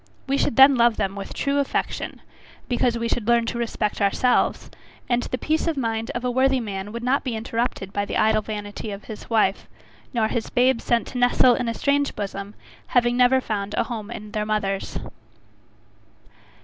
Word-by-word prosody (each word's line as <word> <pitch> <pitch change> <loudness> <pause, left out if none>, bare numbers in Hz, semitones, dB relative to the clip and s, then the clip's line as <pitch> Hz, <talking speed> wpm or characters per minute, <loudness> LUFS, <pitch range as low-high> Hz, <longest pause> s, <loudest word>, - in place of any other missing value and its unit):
We 275 - 0
should 275 - 0
then 270 +2 +8
love 235 -1 +4
them 195 -2 -1
with 200 -1 -7
true 280 0 0
affection, 280 - -2 0.5
because 240 -1 +1
we 230 0 -2
should 230 -2 -2
learn 235 -1 +4
to 235 +1 -3
respect 220 -3 -2
ourselves; 225 +5 +1 0.4
and 240 0 +1
the 255 - -3
peace 315 +5 0
of 325 -3 0
mind 225 -2 -2
of 240 +1 -3
a 250 - +1
worthy 260 +1 +3
man 205 -3 -5
would 235 +1 -6
not 260 +3 +1
be 250 -4 -3
interrupted 225 -3 -3
by 205 0 -1
the - - -3
idle 215 0 +3
vanity 210 0 -6
of 200 0 -7
his 215 -2 -9
wife, 215 -4 +1 0.4
nor 230 -3 +1
his 225 0 -3
babes 250 -1 +2
sent 235 -1 +2
to 250 - -4
nestle 245 0 +5
in 240 0 -1
a 230 - -3
strange 285 +2 +1
bosom, 200 0 -5 0.3
having 240 -1 +2
never 250 +1 +5
found 205 -4 -3
a - - +2
home 220 -3 -6
in 210 -3 -8
their 210 0 -1
mother's. 205 -2 -2
235 Hz, 190 wpm, -23 LUFS, 210-250 Hz, 0.5 s, then